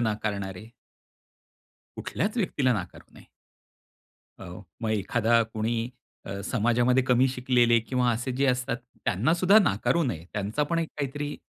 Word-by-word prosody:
नाकारणारे? 105 Hz, -3 st, -3 dB, 1.3 s
कुठल्याच 210 Hz, +7 st, -2 dB
व्यक्तीला 145 Hz, -, +1 dB
नाकारू 95 Hz, -5 st, -7 dB
नये. -, -, -16 dB, 1.1 s
हो, 90 Hz, +2 st, -9 dB, 0.2 s
मग 110 Hz, -1 st, -1 dB
एखादा 115 Hz, +3 st, +2 dB
कोणी 115 Hz, +2 st, -2 dB, 0.4 s
अ, 100 Hz, 0 st, -5 dB
समाजामध्ये 120 Hz, +3 st, +2 dB
कमी 125 Hz, +1 st, +4 dB
शिकलेले 125 Hz, -2 st, +3 dB
किंवा 125 Hz, +2 st, 0 dB
असे 120 Hz, +3 st, -2 dB
जे 140 Hz, -, +2 dB
असतात 125 Hz, -1 st, 0 dB, 0.3 s
त्यांना 115 Hz, -, +2 dB
सुद्धा 185 Hz, +4 st, +5 dB
नाकारू 175 Hz, -3 st, +1 dB
नये. 85 Hz, -, -3 dB
त्यांचा 105 Hz, +7 st, -1 dB
पण 165 Hz, +3 st, -1 dB
एक 165 Hz, -, -1 dB
काहीतरी 145 Hz, +1 st, -3 dB
120 Hz, 130 wpm, -27 LUFS, 110-135 Hz, 1.3 s, सुद्धा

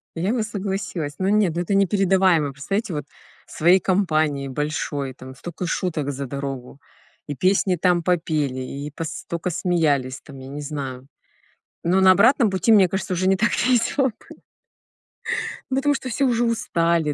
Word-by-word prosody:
Я 185 Hz, +8 st, 0 dB
бы 230 Hz, -3 st, 0 dB
согласилась, 195 Hz, -7 st, -4 dB
но 190 Hz, +1 st, +1 dB
нет, 205 Hz, -6 st, +2 dB
ну 175 Hz, -, 0 dB
это 185 Hz, +3 st, -2 dB
непередаваемо. 190 Hz, -6 st, +3 dB
Представляете, 195 Hz, -, -3 dB
вот 145 Hz, -2 st, -4 dB, 0.4 s
своей 175 Hz, +4 st, +4 dB
компанией 155 Hz, -8 st, +1 dB
большой, 145 Hz, -1 st, -3 dB
там 130 Hz, 0 st, -11 dB
столько 175 Hz, +5 st, -6 dB
шуток 155 Hz, -5 st, -2 dB
за 140 Hz, 0 st, -5 dB
дорогу, 135 Hz, 0 st, -6 dB, 0.5 s
и 145 Hz, -, -4 dB
песни 185 Hz, +3 st, +2 dB
там 175 Hz, 0 st, +2 dB
попели, 155 Hz, -7 st, 0 dB
и 140 Hz, +3 st, -6 dB
пос 160 Hz, +2 st, -5 dB
столько 170 Hz, +1 st, -4 dB
смеялись 150 Hz, -7 st, 0 dB
там, 140 Hz, -2 st, -12 dB
я 130 Hz, -, -10 dB
не 145 Hz, +2 st, -6 dB
знаю. 135 Hz, -3 st, -6 dB, 0.8 s
Но 180 Hz, +3 st, +3 dB
на 190 Hz, 0 st, +7 dB
обратном 230 Hz, +4 st, +5 dB
пути, 190 Hz, +4 st, +1 dB
мне 195 Hz, -4 st, +7 dB
кажется, 190 Hz, 0 st, -3 dB
уже 185 Hz, +1 st, 0 dB
не 195 Hz, -, +4 dB
так 220 Hz, +5 st, +2 dB, 0.2 s
весело 255 Hz, +2 st, +2 dB
бы 220 Hz, -, -10 dB, 1.3 s
Ну, 265 Hz, -, +1 dB
потому 290 Hz, +1 st, +2 dB
что 260 Hz, -, -5 dB
все 275 Hz, +4 st, 0 dB
уже 240 Hz, -1 st, +2 dB
устали, 170 Hz, -9 st, +1 dB
175 Hz, 165 wpm, -22 LUFS, 145-195 Hz, 1.3 s, на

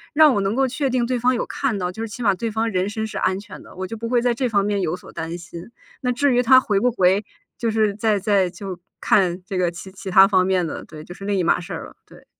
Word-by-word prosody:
让 305 Hz, -2 st, +7 dB
我 205 Hz, -, +1 dB
能 195 Hz, +3 st, -1 dB
够 270 Hz, +1 st, +3 dB
确 265 Hz, +2 st, -1 dB
定 250 Hz, -1 st, +1 dB
对 250 Hz, 0 st, -1 dB
方 250 Hz, +2 st, +2 dB
有 -, -, -2 dB
看 260 Hz, -7 st, -2 dB
到， 180 Hz, -2 st, -2 dB
就 220 Hz, -, -8 dB
是 225 Hz, -, -3 dB
起 230 Hz, +3 st, -7 dB
码 200 Hz, -3 st, +4 dB
对 230 Hz, +4 st, -3 dB
方 225 Hz, +1 st, -1 dB
人 185 Hz, 0 st, 0 dB
身 220 Hz, +1 st, -3 dB
是 220 Hz, -, -6 dB
安 185 Hz, 0 st, +1 dB
全 205 Hz, -, -11 dB
的， -, -, -15 dB
我 185 Hz, -, -4 dB
就 205 Hz, -, -6 dB
不 230 Hz, +1 st, -5 dB
会 245 Hz, 0 st, +3 dB
在 245 Hz, 0 st, +2 dB
这 255 Hz, +2 st, -1 dB
方 200 Hz, -2 st, +2 dB
面 205 Hz, -1 st, 0 dB
有 165 Hz, -1 st, -1 dB
所 -, -, -14 dB
担 165 Hz, +2 st, -5 dB
心。 170 Hz, +2 st, -10 dB, 0.3 s
那 250 Hz, -, 0 dB
至 270 Hz, +2 st, +2 dB
于 245 Hz, -, +4 dB
他 255 Hz, +1 st, +7 dB
回 205 Hz, -6 st, 0 dB
不 250 Hz, -, +2 dB
回， 195 Hz, -2 st, +2 dB, 0.3 s
就 230 Hz, -, -1 dB
是 215 Hz, -2 st, +1 dB
再 215 Hz, 0 st, +1 dB
再 195 Hz, -2 st, +2 dB
就 185 Hz, 0 st, -8 dB, 0.2 s
看 180 Hz, -2 st, +2 dB
这 195 Hz, -1 st, -4 dB
个 180 Hz, -1 st, +2 dB
其 175 Hz, +3 st, -10 dB
其 195 Hz, +1 st, -8 dB
它 190 Hz, +1 st, +7 dB
方 185 Hz, -2 st, +2 dB
面 185 Hz, -2 st, +1 dB
的， 160 Hz, -, -5 dB
对， 155 Hz, -1 st, -11 dB
就 175 Hz, -, -10 dB
是 195 Hz, -, -12 dB
另 200 Hz, -1 st, 0 dB
一 180 Hz, -, +1 dB
码 -, -, +2 dB
事 180 Hz, -, -8 dB
儿 -, -, -6 dB
了， -, -, -14 dB
对。 -, -, -18 dB
205 Hz, 320 characters per minute, -22 LUFS, 185-235 Hz, 0.3 s, 让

